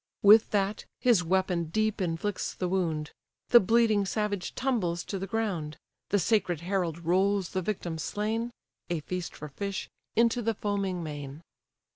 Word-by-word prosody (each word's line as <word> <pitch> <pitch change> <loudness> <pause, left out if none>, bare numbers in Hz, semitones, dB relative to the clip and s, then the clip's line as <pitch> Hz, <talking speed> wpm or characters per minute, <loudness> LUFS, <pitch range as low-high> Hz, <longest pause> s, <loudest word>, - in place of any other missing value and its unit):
With 210 +2 +8
that, 200 0 0
his 235 -8 +4
weapon 180 -1 +1
deep 215 +5 0
inflicts 180 +3 -2
the 180 - -2
wound; 165 -5 -1 0.4
The 240 - +9
bleeding 220 0 +3
savage 205 -3 -2
tumbles 200 -10 0
to 195 - -4
the 195 - -4
ground; 185 -9 -2 0.3
The 205 - +3
sacred 185 -4 +1
herald 170 -3 -2
rolls 190 +2 +2
the 185 - -2
victim 175 -4 -3
slain 220 +7 -2 0.4
(A 170 -3 -1
feast 180 +2 -5
for 150 - -7
fish) 200 +7 -4 0.2
into 235 +1 +3
the 225 -1 0
foaming 195 -4 -2
main. 145 0 -7
190 Hz, 150 wpm, -29 LUFS, 170-215 Hz, 0.4 s, The